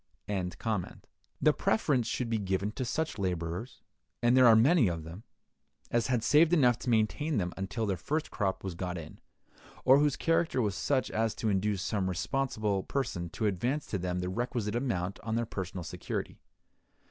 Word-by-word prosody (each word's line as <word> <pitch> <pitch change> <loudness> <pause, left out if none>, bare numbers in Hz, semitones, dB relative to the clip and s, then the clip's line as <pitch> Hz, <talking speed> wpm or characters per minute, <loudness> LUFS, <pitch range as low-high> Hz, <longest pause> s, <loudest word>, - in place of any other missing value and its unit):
(174) 100 +1 -3 0.4
The - - +6
preference 120 +1 +1
should 125 - -2
be 115 -1 0
given 95 +1 -1
to 130 - -4
such 150 0 -2
laborers, 90 +4 -3 0.4
and 120 +1 +5
there 130 -1 +7
are 115 - +8
many 130 - +5
of 85 -2 -2
them, 85 +5 -9 0.7
as 120 -1 +1
had 125 -3 +1
saved 155 +6 +5
enough 125 -8 +4
to - - -4
maintain 120 +6 +1
them 90 -3 -1
until 95 +4 -3
their 95 -3 -1
first 150 - -2
crop 95 -4 -1
was 95 -2 -3
got 90 +1 -4
in, 80 -2 -9 0.7
or 135 +2 +7
whose 145 -2 +2
character 165 -4 +1
was 105 -5 +1
such 130 +5 0
as 110 -1 0
to 110 - -1
induce 100 -1 0
some 100 -4 -1
responsible 105 +1 -1
person 95 -9 -3
to 110 - -3
advance 120 +9 0
to 100 - -3
them 90 0 -2
the 90 - -2
requisite 115 +1 -2
amount 100 -7 -2
on 110 -1 -3
their 120 0 0
personal 95 -4 -5
security. - - -5
110 Hz, 180 wpm, -30 LUFS, 95-125 Hz, 0.7 s, are